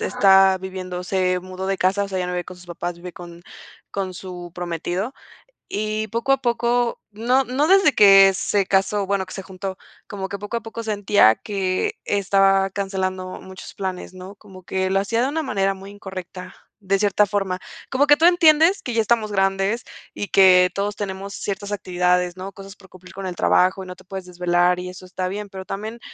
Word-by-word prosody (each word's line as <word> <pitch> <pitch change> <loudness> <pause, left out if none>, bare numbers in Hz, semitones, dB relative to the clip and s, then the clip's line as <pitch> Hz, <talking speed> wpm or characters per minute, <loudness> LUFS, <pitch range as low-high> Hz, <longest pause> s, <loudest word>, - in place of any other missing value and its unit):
está 190 -1 +4
viviendo 185 -1 -6
se 185 -1 0
mudó 185 +1 -7
de 195 - -1
casa, 195 +2 +2
o - - -7
sea, 190 -1 -3
ya 180 - -1
no 180 - -4
vive 180 0 -2
con 185 - -10
sus 180 0 -16
papás, 175 0 -5
vive 175 0 -9
con 175 -1 -11 0.5
con 190 -2 -4
su 180 -1 -8
prometido 175 - -3 0.5
y, 215 +1 -2
poco 235 +6 0
a 270 - +2
poco 240 0 0
no 245 +6 +1
no 265 +5 0
desde 385 -6 +5
que 195 -2 +8
se 200 +1 0
casó, 195 +1 +1
bueno, 195 -1 -1
que 185 - -10
se 195 - -6
juntó, 190 0 -6 0.3
como 195 -2 -5
que 200 - -4
poco 205 +4 -5
a - - -15
poco 230 0 -7
sentía 205 - +4
que 195 - -2
estaba 195 -1 +3
cancelando 185 -2 -3
muchos 190 0 -11
planes, 185 -1 -5
¿no? 185 +2 -10
Como 190 -3 -15
que 190 +1 -1
lo 195 - +2
hacía 230 +4 -1
de 260 - +1
una 315 +3 -2
manera 195 -7 0
muy 195 +1 -11
incorrecta, 190 -2 -9 0.3
de 195 0 0
cierta 205 0 +3
forma. 195 -2 -2 0.3
Como 275 +2 +2
que 290 0 +6
tú 325 - +1
entiendes 335 +1 +5
que 245 - -4
ya 225 - +3
estamos 220 -1 +1
grandes 195 +4 0 0.3
y 205 - -4
que 180 -1 +6
todos 200 +1 -2
tenemos 195 0 -5
ciertas 200 0 -4
actividades, 180 -2 0
¿no?, 195 +1 -6
cosas 195 0 -11
por 190 -1 -18
cumplir 185 0 -15
con 195 0 -6
el 180 - -5
trabajo 185 +2 +2
y - - -13
no 180 0 -8
te 185 - -18
puedes 190 0 -7
desvelar 180 0 +1
y 180 0 -5
eso 180 0 -10
está 185 0 -3
bien. 205 +2 -5
Pero 190 -1 -8
también 215 +4 -5
195 Hz, 205 wpm, -22 LUFS, 185-205 Hz, 0.5 s, que